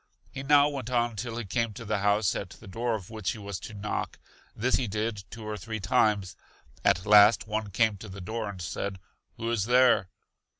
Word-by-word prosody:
He 135 - -6
now 145 +1 +5
went 135 -5 -4
on 120 -2 +1
till 115 +2 -4
he 120 - -4
came 115 +2 -1
to 115 - -9
the 105 -1 0
house 100 0 +2
at 100 - -4
the 110 - -14
door 115 +4 -1
of 100 -1 -8
which 110 -4 -2
he - - -9
was 100 -3 -6
to 105 - -9
knock; 105 +1 -3 0.4
this 125 +4 +2
he 125 - -1
did 105 0 -2
two 115 0 -9
or 105 0 -3
three 110 +3 -5
times. 100 0 +1 0.5
At 90 +4 +3
last 105 +1 +7
one 110 -1 -3
came 110 +1 +2
to 105 +2 -10
the 95 +1 -8
door 110 +3 -4
and 100 -2 -8
said: 95 +4 -4 0.4
Who 115 +1 -2
is 110 -4 0
there? 125 -5 +4
110 Hz, 215 wpm, -28 LUFS, 100-115 Hz, 0.5 s, last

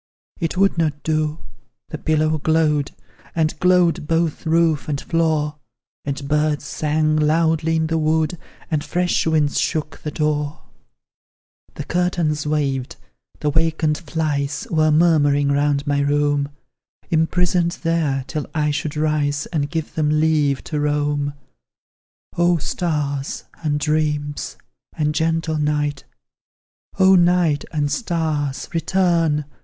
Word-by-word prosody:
It 165 0 -2
would 195 -2 +3
not 150 -3 -1
do 155 0 -1 0.5
the 155 - -6
pillow 155 0 +1
glowed, 150 -2 +2 0.5
And 160 -2 +1
glowed 180 -4 +3
both 165 0 0
roof 160 -4 +2
and 140 -2 -1
floor; 155 -2 0 0.5
And 140 0 -4
birds 150 0 +1
sang 155 +1 0
loudly 160 +1 +2
in 160 0 +1
the 160 0 0
wood, 160 +1 +1 0.3
And 150 -2 0
fresh 180 -1 0
winds 155 -3 +2
shook 155 -1 -2
the 150 - -5
door; 150 -1 -2 1.1
The - - -5
curtains 165 -3 0
waved, 140 -4 -1 0.5
the 150 - +1
wakened 160 -1 +1
flies 145 -4 -2
Were 155 -2 +3
murmuring 145 -3 +3
round 145 0 +1
my 145 -1 +1
room, 145 0 +1 0.6
Imprisoned 170 +1 +2
there, 155 -6 0
till 155 -3 -4
I 150 -1 +1
should 150 +1 -3
rise, 150 -1 0
And 145 -3 0
give 160 0 -4
them 150 -1 +1
leave 150 -3 +2
to 150 - -3
roam. 145 -1 0 1.0
Oh, 175 0 +3
stars, 145 -4 -2 0.2
and 150 -2 0
dreams, 150 -1 -1 0.4
and 150 -1 +1
gentle 160 0 0
night; 150 -1 -1 0.9
Oh, 190 0 +6
night 175 -4 +3
and 145 -2 -1
stars, 155 - -1
return! 165 -3 +1
155 Hz, 125 wpm, -21 LUFS, 145-165 Hz, 1.1 s, Oh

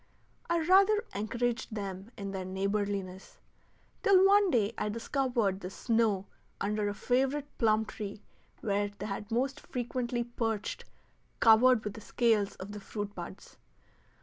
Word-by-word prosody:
I 340 0 +2
rather 390 +5 +5
encouraged 230 +2 -2
them 195 0 -5
in 200 -1 -5
their 190 -1 -4
neighborliness, 195 0 -3 0.6
till 390 -3 +6
one 400 0 +5
day 230 - +2
I 210 - -2
discovered 230 -3 0
the 185 - -6
snow 220 -2 +1 0.3
under 210 0 0
a 205 - -4
favorite 270 +5 0
plum 220 -1 +3
tree 210 -1 -7 0.4
where 205 -1 0
they 205 0 -5
most 265 +5 0
frequently 245 -1 -2
perched 225 -3 -3 0.5
covered 230 +1 +6
with 210 - -4
the 220 - -10
scales 220 -3 +1
of 190 +2 -8
the 210 - -6
fruit 205 0 -5
buds. - - -9
220 Hz, 135 wpm, -31 LUFS, 200-250 Hz, 0.6 s, till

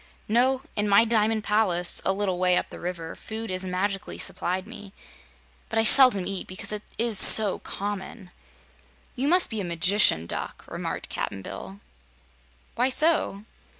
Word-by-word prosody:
"No. 255 +4 +1
In 210 0 -1
my 200 +3 +5
diamond 220 -1 0
palace, 185 -5 +2
a - - +1
little 190 -2 -2
way 180 -1 +2
up - - -3
the - - -10
river, 170 -2 -6
food 220 -1 -8
is 185 0 -3
magically 190 +1 -3
supplied 185 +1 -3
me; 210 -3 -12 0.8
but 225 - -4
I 225 - +3
seldom 225 -5 +6
eat, 195 -2 -4
because 185 +3 -3
it 210 -1 -4 0.2
is 225 -3 0
so 210 -1 +6
common." 200 -1 -7 0.8
"You 265 +2 -2
must 355 0 +3
be 220 -2 -3
a - - -4
Magician 175 - +3
Duck," - - -7
remarked - - -6
Cap'n 100 -1 -5
Bill. 95 +1 -9 0.9
"Why 250 +2 +1
so?" 300 -8 +1
205 Hz, 155 wpm, -25 LUFS, 185-225 Hz, 0.9 s, seldom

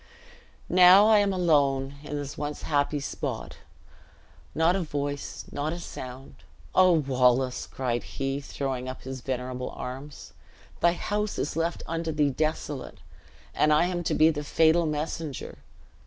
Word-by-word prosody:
"Now 185 +3 +8
I 215 -1 +6
am 200 -1 +2
alone 140 -7 +2
in 150 0 -6
this 145 0 -5
once 150 0 -5
happy 145 0 0
spot. 140 - -5 1.0
Not 165 +3 +3
a 195 - 0
voice, 145 -3 -4
not 150 +3 -2
a 175 - -6
sound. 130 -5 -9 0.4
Oh, 185 -1 +6
Wallace!" 130 -4 +2
cried 120 -3 -2
he, 135 0 -3
throwing 130 -2 -4
up 130 - -8
his 130 -1 -6
venerable 125 0 -4
arms, 135 +3 -8 0.5
"thy 170 0 +4
house 210 +3 -2
is 145 - -2
left 165 +1 -1
unto 165 0 -3
thee 150 -2 +2
desolate, 150 -1 -3 0.6
and 155 - +3
I 150 +3 +4
am 175 -1 -2
to - - +1
be 160 +1 +5
the 150 -1 -4
fatal 160 +2 +3
messenger." 150 -1 -4
150 Hz, 145 wpm, -27 LUFS, 135-165 Hz, 1.0 s, Now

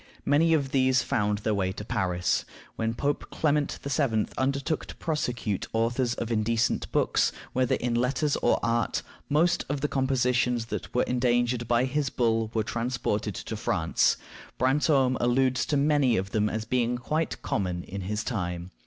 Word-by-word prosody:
Many 160 +3 +4
of 140 -3 -1
these 130 -1 +3
found 105 0 0
their 110 +1 -1
way 95 -2 0
to 105 - -7
Paris. 90 -3 0 0.3
When 115 0 -1
Pope 145 +3 -2
Clement 150 -1 0
VII. 140 -6 +1
undertook 140 +3 -1
to - - -9
prosecute 125 - -2
the - - -1
authors 120 +2 +1
of 115 0 -4
indecent 115 +1 +1
works, - - +2 0.2
whether 130 -1 +2
in 120 -1 -2
letters 125 +5 +1
or - - +2
art, 115 -1 0 0.3
most 165 +4 +3
of 145 -1 -2
the 150 - +1
compositions 125 -3 +1
that - - -4
were 125 - +4
endangered 120 -1 +1
by 120 +1 +3
his 140 +1 -1
bull 115 -3 +1
were 110 - +2
transported 115 -2 -2
to - - -5
France. - - +1 0.4
Brantome 130 -1 +3
alludes 130 +1 +2
to 145 - +1
many 140 -4 +3
of 95 +1 -3
them 105 -1 +1
as 110 +1 -3
being 120 0 0
quite 155 +7 -2
common 90 -3 -2
in 100 +1 -6
his 105 +3 -2
time. 90 -5 -3
120 Hz, 165 wpm, -27 LUFS, 110-135 Hz, 0.4 s, Many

